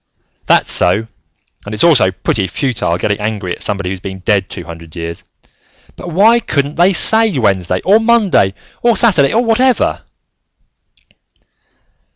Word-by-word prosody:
"That's - - +2
so, 110 +2 +2 0.6
and 105 +1 -6
it's 105 - 0
also 135 - +4
pretty 95 +1 -2
futile 115 - -2
getting 100 +3 -2
angry 105 -3 -4
at - - -16
somebody 100 -3 -2
who's 95 - -5
been 95 0 -7
dead 100 -1 0
two 90 - -7
hundred 85 -1 -12
years, 85 0 -7 0.7
but 175 - -9
why 215 +8 +3
couldn't 145 -9 -2
they 175 +4 +3
say 220 -1 +3
Wednesday, 95 -6 0
or 205 +4 +4
Monday, 220 - +2 0.3
or 235 -2 +2
Saturday, 160 - +3
or 240 +2 +1
whatever?" 245 +3 +1
110 Hz, 145 wpm, -14 LUFS, -, 0.7 s, also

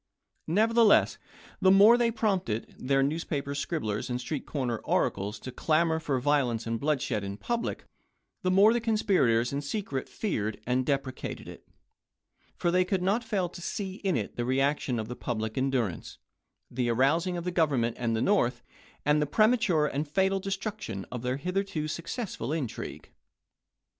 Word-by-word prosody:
Nevertheless, 220 +4 +4 0.4
the 190 - +5
more 200 +5 +8
they 240 -1 +2
prompted 195 - -1
their 135 +1 +2
newspaper 140 -1 -2
scribblers 140 - -2
and 125 0 -1
street 140 +3 -4
corner 125 -6 -2
oracles 100 +3 -1
to 130 - -6
clamor 160 +3 +1
for 145 -5 -1
violence 125 -5 +1
and 115 0 -2
bloodshed 140 -8 0
in 100 0 -5
public, 235 - -3 0.6
the 185 - 0
more 200 +4 +6
the 240 - 0
conspirators 180 - +2
in 140 - -1
secret 145 -4 -4
feared 110 - -2
and 125 +1 0
deprecated 135 -3 -3
it, - - -11 0.9
for 175 - 0
they 180 +1 +4
could 185 0 -1
not 205 +6 +1
fail 200 -5 -1
to 175 - -10
see 190 +1 -4
in 190 -8 0
it 105 - -5
the 120 - 0
reaction 135 0 +1
of 110 -1 -3
the 125 - -6
public 110 -3 -3
endurance, 130 - -1 0.5
the 120 -1 -1
arousing 160 +9 +2
of 170 - -4
the 180 - -2
Government 140 -9 +1
and 115 -2 0
the 110 - 0
North, 190 -12 +2 0.4
and 150 +1 +3
the 150 - +1
premature 215 - +3
and 150 +1 -2
fatal 190 +5 +1
destruction 195 - -4
of 125 - -4
their 125 +2 -1
hith 180 +6 -4
erto 185 -6 -1
successful 170 - -4
intrigue. 150 -8 -5
150 Hz, 165 wpm, -28 LUFS, 125-190 Hz, 0.9 s, more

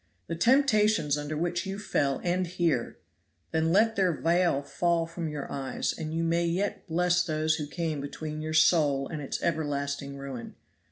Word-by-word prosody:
The 165 - -4
temptations 215 - +3
under 150 +1 -4
which 175 +2 -1
you 195 0 -3
fell 140 -9 0
end 180 +1 0
here; 160 -9 0 0.5
then 160 0 +1
let 220 +4 +4
their 190 -2 +3
veil 170 -2 +1
fall 170 +3 0
from 165 -1 -5
your 150 -2 -5
eyes, 135 -2 -2
and 155 -1 -5
you 165 +1 -1
may 165 +1 +1
yet 190 +5 -2
bless 180 +1 +2
those 155 -1 0
who 150 -2 -4
came 160 -2 -3
between 155 +2 -5
your 155 0 -3
soul 150 -4 +4
and 155 -3 -5
its 140 - -3
everlasting 140 -3 -2
ruin. 135 -3 -7
160 Hz, 170 wpm, -28 LUFS, 145-175 Hz, 0.5 s, let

